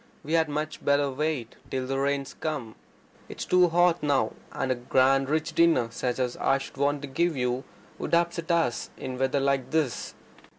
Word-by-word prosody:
We 155 - -4
had 160 -2 +3
much 155 +1 -3
better 140 0 +2
wait 140 -4 -2
till 130 -1 -2
the 135 +1 -2
rains 140 0 -1
come. 140 -8 -4 0.6
It's - - -6
too 180 -1 +5
hot 175 0 +3
now. 140 -7 +1 0.2
And 135 - -2
a - - +2
grand 130 +2 +2
rich 155 +1 0
dinner 165 -9 +4
such 125 +1 -2
as 125 -2 -1
I 135 - +2
should 135 0 -9
want 145 +1 +1
to - - -4
give 165 +3 0
you 125 +1 -1 0.3
would - - +1
upset 170 0 0
us 165 -9 +1
in 130 -1 -5
weather 135 +1 +1
like 135 -2 0
this." 155 -6 -1
140 Hz, 185 wpm, -27 LUFS, 130-160 Hz, 0.6 s, too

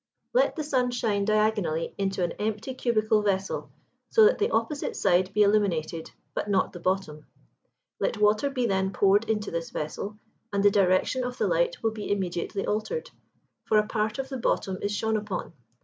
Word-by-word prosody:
Let - - +3
the 310 - -3
sun 260 -4 +1
shine 220 -5 0
diagonally 210 -6 +1
into 195 -2 -1
an 175 - 0
empty 215 +4 -2
cubical 220 -4 +1
vessel, 195 -2 -1 0.4
so 445 -2 +6
that 450 - +4
the 430 +2 +2
opposite 300 -10 -1
side 185 -1 +2
be 210 +1 +4
illumined, 175 -6 +1 0.2
but - - -3
not 195 -2 +1
the 175 - -8
bottom: 175 -5 -2 0.7
let - - 0
water 210 +6 +3
be 255 -3 -1
then 190 -2 0
poured 205 +3 +3
into 210 -1 -1
this 165 0 -3
vessel, 195 +7 -5 0.3
and 200 -1 0
the 205 - +6
direction 195 +6 +2
of 250 0 -4
the - - +1
light - - 0
will 225 - +2
be 215 -2 -5
immediately 190 0 -2
altered; 320 - -2 0.5
for 215 - +3
a 210 - +4
part 215 0 -1
of 265 0 -4
the 265 - -4
bottom 190 -4 0
is 205 - -1
shone 220 +1 0
upon. 205 -5 -4
210 Hz, 180 wpm, -27 LUFS, 190-230 Hz, 0.7 s, so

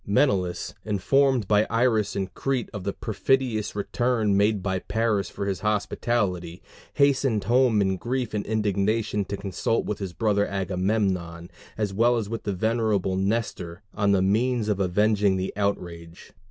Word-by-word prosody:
Menelaus, 100 -5 +1
informed 120 +3 +2
by 105 +1 +3
Iris 115 -3 +1
in 100 -1 0
Crete 135 -3 -2
of 100 -3 -6
the 100 - 0
perfidious 110 +1 -1
return 110 0 0
made 100 -1 +2
by 95 -1 -1
Paris 105 0 -1
for 100 - -5
his 95 -3 -2
hospitality, 100 -4 -1 0.3
hastened 135 -6 +2
home 120 +1 +3
in 95 -1 0
grief 125 +3 -3
and 105 -1 -1
indignation 105 0 0
to 100 +1 -4
consult 100 +3 -1
with 105 - -3
his 95 -3 -5
brother 100 +1 +1
Agamemnon, 95 -3 -1 0.3
as 105 -3 -1
well 120 +4 +3
as 110 -3 -2
with 115 0 -5
the 100 - -1
venerable 110 -2 0
Nestor, 95 -2 -2
on 105 -1 +1
the 95 -2 +3
means 110 +3 +1
of 100 -2 0
avenging 100 +1 +2
the 95 0 -3
outrage. 85 -4 -4
105 Hz, 155 wpm, -25 LUFS, 95-115 Hz, 0.3 s, by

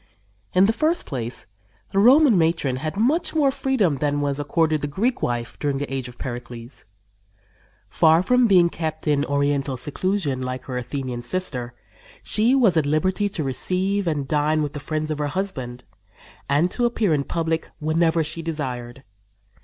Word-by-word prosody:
In 185 +1 +6
the 220 - +2
first 320 +7 0
place 120 -4 -5 0.5
the 195 - +3
Roman 260 +3 +6
matron 160 -6 +1
had 155 +7 -4
much 285 +11 +1
more 285 -3 +3
freedom 235 - +1
than 145 +1 0
was 140 -1 -1
accorded 155 +1 +1
the 145 - -1
Greek 225 - -1
wife 120 -1 -3
during 145 -2 -1
the 140 -1 -4
age 130 -2 -3
of 125 - -12
Pericles. 120 0 -8 1.0
Far 160 +2 +4
from 250 +3 +4
being 180 -4 +5
kept 160 -2 -5
in 145 -1 +2
oriental 140 -2 0
seclusion, 145 0 -2
like 130 0 -4
her 130 - -6
Athenian 125 0 -4
sister, 125 -5 -3 0.5
she 230 +5 +2
was 230 -10 +4
at 150 -3 +2
liberty 185 +7 +1
to 190 -6 -3
receive 185 +8 0
and 145 -4 -1
dine 150 +1 +1
with 145 - -4
the 145 - -5
friends 155 +2 -3
of 150 - -3
her 150 - 0
husband, 135 -8 -4 0.7
and 150 +6 +2
to 245 - 0
appear 225 -7 +1
in 145 -2 +1
public 165 +1 -2
whenever 160 +1 +2
she 160 +2 -4
desired. 130 -6 -5
155 Hz, 170 wpm, -23 LUFS, 135-185 Hz, 1.0 s, In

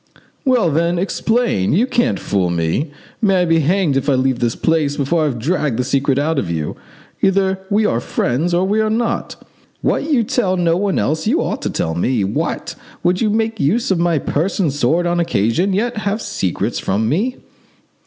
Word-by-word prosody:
"Well, 245 - +3
then, 170 +3 +1
explain; 205 - 0
you 210 +10 +3
can't 245 -1 0
fool 95 -3 0
me! 85 - -1 0.3
May 195 -4 +3
I - - +1
be 165 -1 +3
hanged 165 -1 +1
if 135 +2 0
I 135 - +4
leave 130 -1 +1
this 120 -1 0
place 155 -3 0
before 155 +4 +1
I - - +2
have 135 -5 -1
dragged 145 -1 -1
the 125 - +1
secret 135 +1 +1
out 150 +1 +1
of 90 - -3
you! 80 -3 -3 0.5
Either 190 0 +2
we 210 +1 +2
are 115 - +1
friends 130 +7 -1
or 175 +2 +2
we 210 +3 +1
are 215 - +1
not. 235 +1 -1 0.5
What 300 - 0
you 265 -6 +3
tell 195 -4 0
no 170 -2 +2
one 195 +1 0
else 155 +2 0
you - - +2
ought - - -3
to - - -2
tell 80 - -2
me. 105 +6 0
What! 95 - -2 0.3
would 180 +1 +1
you 220 - +2
make 220 0 -1
use 205 +11 +1
of 185 - +2
my 170 -2 +2
purse 155 +6 -1
and 180 -6 +2
my - - -4
sword 150 +6 +1
on 175 0 +1
occasion 165 - +1
and 195 -1 0
yet 235 +3 -1
have 210 0 -1
secrets 100 - -2
from 105 +3 0
me? 210 - 0
170 Hz, 210 wpm, -18 LUFS, 135-200 Hz, 0.5 s, I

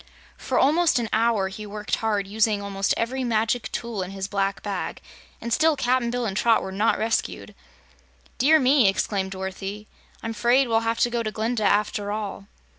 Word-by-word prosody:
For - - -2
almost 315 +1 +3
an 235 -2 -1
hour 220 -3 +2
he 190 +3 -8
worked 210 +1 -3
hard, 210 -3 0
using 210 +1 +1
almost 200 -1 -1
every 255 +3 -1
magic 230 0 0
tool 235 -4 -4
in 180 - -4
his 195 0 -5
black 195 0 -1
bag, 200 -3 -4 0.4
and 235 - -3
still 320 +3 +3
Cap'n 255 -2 +1
Bill 245 0 -2
and 195 -3 -3
Trot 230 +2 +3
were 190 - -5
not 205 +4 +1
rescued. 225 +1 -2 0.9
"Dear 310 +5 +5
me!" 260 -4 +4
exclaimed 195 0 0
Dorothy, 195 +2 -6 0.4
"I'm 225 - -3
'fraid 240 +5 +3
we'll 225 -1 +2
have 230 0 -1
to 240 - +3
go 235 -1 0
to 220 - -2
Glinda, 220 +1 -1
after 205 0 +1
all." 205 -2 -5
220 Hz, 185 wpm, -24 LUFS, 200-235 Hz, 0.9 s, Dear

